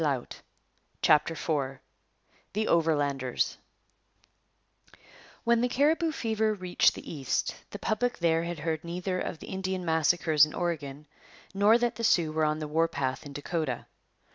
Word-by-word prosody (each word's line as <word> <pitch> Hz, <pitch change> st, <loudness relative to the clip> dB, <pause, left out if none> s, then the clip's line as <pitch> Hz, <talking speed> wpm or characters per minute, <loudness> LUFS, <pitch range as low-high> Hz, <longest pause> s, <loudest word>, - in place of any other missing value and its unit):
CHAPTER 155 Hz, +2 st, +4 dB
IV 140 Hz, -5 st, -2 dB, 0.8 s
THE 215 Hz, +2 st, 0 dB
OVERLANDERS 145 Hz, -6 st, +1 dB, 1.8 s
When 235 Hz, 0 st, +3 dB
the 245 Hz, -, +1 dB
Cariboo 315 Hz, +6 st, +2 dB
fever 220 Hz, -5 st, 0 dB
reached 185 Hz, -2 st, +2 dB
the -, -, -10 dB
East, 135 Hz, -4 st, -1 dB, 0.2 s
the -, -, -7 dB
public 235 Hz, +4 st, -1 dB
there 165 Hz, -1 st, +2 dB
had 170 Hz, 0 st, -4 dB
heard 160 Hz, +1 st, -2 dB
neither 180 Hz, +2 st, -3 dB
of -, -, -4 dB
the -, -, -11 dB
Indian 190 Hz, -1 st, -3 dB
massacres 160 Hz, -1 st, +3 dB
in 150 Hz, -, +1 dB
Oregon 150 Hz, -4 st, -3 dB, 0.5 s
nor 205 Hz, +3 st, +5 dB
that 240 Hz, 0 st, -1 dB
the 230 Hz, -, -4 dB
Sioux 170 Hz, -8 st, +3 dB
were 155 Hz, 0 st, +1 dB
on 150 Hz, 0 st, +1 dB
the 155 Hz, -1 st, -4 dB
war 165 Hz, +2 st, +2 dB
path 135 Hz, -3 st, -3 dB
in 140 Hz, -, -10 dB
Dakota. 145 Hz, -2 st, -3 dB
165 Hz, 140 wpm, -28 LUFS, 150-205 Hz, 1.8 s, nor